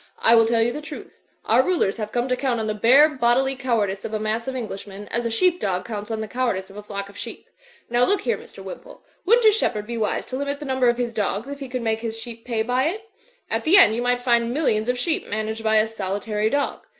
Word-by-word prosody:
I 230 - +4
will 225 -1 +6
tell 230 0 +3
you 240 - +1
the 300 - -6
truth. 310 - -10 0.2
Our - - +5
rulers 345 - 0
have 215 -1 -4
come 245 +1 0
to 255 - +1
count 255 -3 -1
on 220 - -2
the 215 - -1
bare 250 +8 +6
bodily 265 -1 +1
cowardice 220 -7 -1
of 220 - -4
a - - -1
mass 215 +2 -2
of 265 - -3
Englishmen, 205 -3 -6
as 235 0 -1
a - - -2
sheep 355 +10 +2
dog 185 -2 -2
cotmts 210 -2 -5
on 220 -1 -3
the 220 - -4
cowardice 215 -6 -2
of - - -15
a - - -6
flock 200 -1 -6
of 200 - -15
sheep. - - -7 0.4
Now, 240 +1 +2
look 400 +10 +2
here, 470 - 0
Mr. - - -13
Wimpole, - - -10 0.2
wouldn't 465 +2 +5
a 435 - +8
shepherd 225 - 0
be 235 +1 -4
wise 215 - -1
to 255 - -5
limit 280 +1 -2
the 300 - -7
number 260 -2 +2
of 240 - +1
his 240 -1 -2
dogs 210 +1 -2
if 280 0 -6
he 270 -2 -7
could 250 -1 -3
make 220 -1 0
his 225 -1 -4
sheep 230 0 -8
pay 230 -3 -1
by 250 +3 +1
it? 430 +7 -4 0.4
At - - -2
the 350 +5 +6
end 225 - +7
you 235 - -1
might 245 0 +1
find 235 -2 +2
millions 240 -6 +1
of 250 - +1
sheep 320 +6 -1
managed 220 +1 -3
by 220 0 +2
a 215 0 +5
solitary 210 0 -2
dog. 285 +2 -1
235 Hz, 265 wpm, -23 LUFS, 215-260 Hz, 0.4 s, a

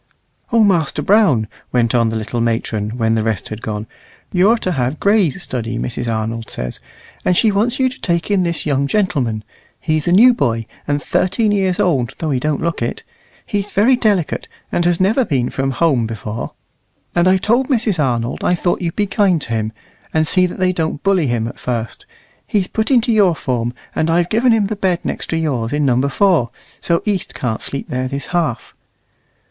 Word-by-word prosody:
"O 230 -1 +5
Master 175 -8 +1
Brown," 185 - +3 0.2
went 120 -2 +1
on 115 -2 +3
the 110 - -3
little 115 +2 -2
matron, 115 -1 -1
when 110 -2 +1
the 110 - +1
rest 110 -4 -2
had 110 0 -7
gone, 105 -1 -4 0.5
"you're 195 +6 +4
to 185 - -2
have 130 -1 -1
Gray's 200 -8 +2
study, 115 -2 -3
Mrs. 120 -1 -3
Arnold 115 +1 -3
says. 60 0 -5 0.4
And 180 - +2
she 220 - +4
wants 215 +4 +1
you 260 - +4
to 255 0 -7
take 170 +2 -1
in 200 -2 +3
this 170 -2 -1
young 140 -2 +1
gentleman. 140 - 0 0.4
He's 155 -1 0
a - - +3
new 235 +7 +7
boy, 115 - 0 0.2
and 145 0 -1
thirteen 210 +4 +1
years 190 -1 +1
old 135 - +1
though 160 -2 -2
he 130 - +1
don't 150 +2 -1
look 170 -5 -2
it. 115 - -3 0.4
He's 205 0 -2
very 225 +6 +4
delicate, 205 -9 0 0.2
and 175 - 0
has 175 -1 +2
never 215 +8 +3
been 130 - -1
from 135 0 -1
home 135 -4 +1
before. 110 0 -5 0.6
And 175 +1 +3
I 185 +1 +5
told 240 +7 +1
Mrs. 220 - +1
Arnold 120 -2 -1
I 180 - +3
thought 175 +1 -1
you'd 170 -2 -2
be 210 - +1
kind 195 -4 +2
to - - -8
him, 110 -1 -1 0.4
and 160 0 +3
see 185 +2 +4
that - - -8
they 185 -1 +1
don't 160 -3 -2
bully 190 -6 +2
him 120 -2 -1
at 120 - -9
first. 115 -2 -4 0.4
He's 200 -3 +1
put 220 +3 -2
into 245 -2 +3
your 195 -6 +4
form, 120 -5 -2 0.2
and 160 - 0
I've 170 +1 +2
given 235 +3 +3
him 220 -2 +3
the 215 +2 -2
bed 185 -3 0
next - - -4
to 165 - 0
yours 130 -8 -1
in 145 0 +1
Number 130 +1 +2
4; 165 - +2 0.3
so 170 -1 0
East 200 -5 -2
can't 115 -4 -2
sleep 140 - -5
there 130 0 -2
this 140 +1 -4
half." 155 -9 -1
160 Hz, 200 wpm, -18 LUFS, 120-195 Hz, 0.6 s, new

